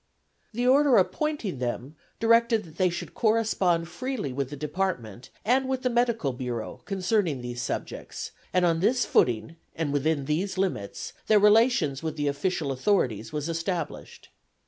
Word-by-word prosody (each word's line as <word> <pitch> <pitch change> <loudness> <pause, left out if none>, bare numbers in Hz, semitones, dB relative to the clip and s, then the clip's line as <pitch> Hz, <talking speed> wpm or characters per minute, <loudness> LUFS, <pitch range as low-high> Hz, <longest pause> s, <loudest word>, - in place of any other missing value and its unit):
The 240 +3 -1
order 270 0 +5
appointing 200 - 0
them 125 +4 -3 0.2
directed 230 0 +4
that 160 -2 -15
they 185 -1 +3
should 175 - -6
correspond 210 -7 +2
freely 205 - -4
with 135 0 -2
the 145 - -6
department 145 - -3 0.2
and 260 +4 +2
with 260 -1 -1
the 250 - +1
Medical 235 - +1
Bureau 120 -3 -5
concerning 185 - 0
these 120 0 -4
subjects, - - -5 0.2
and 180 -1 +3
on 165 -1 +2
this 240 +6 +2
footing 120 +7 +1 0.2
and 155 -3 -2
within 145 0 +1
these 180 +7 -1
limits 180 - -2
their 215 - +6
relations 210 - +4
with 160 -1 -3
the 145 -1 0
official 145 +1 -1
authorities 125 - 0
were 150 - -2
established. 165 0 -4
175 Hz, 150 wpm, -27 LUFS, 140-220 Hz, 0.2 s, their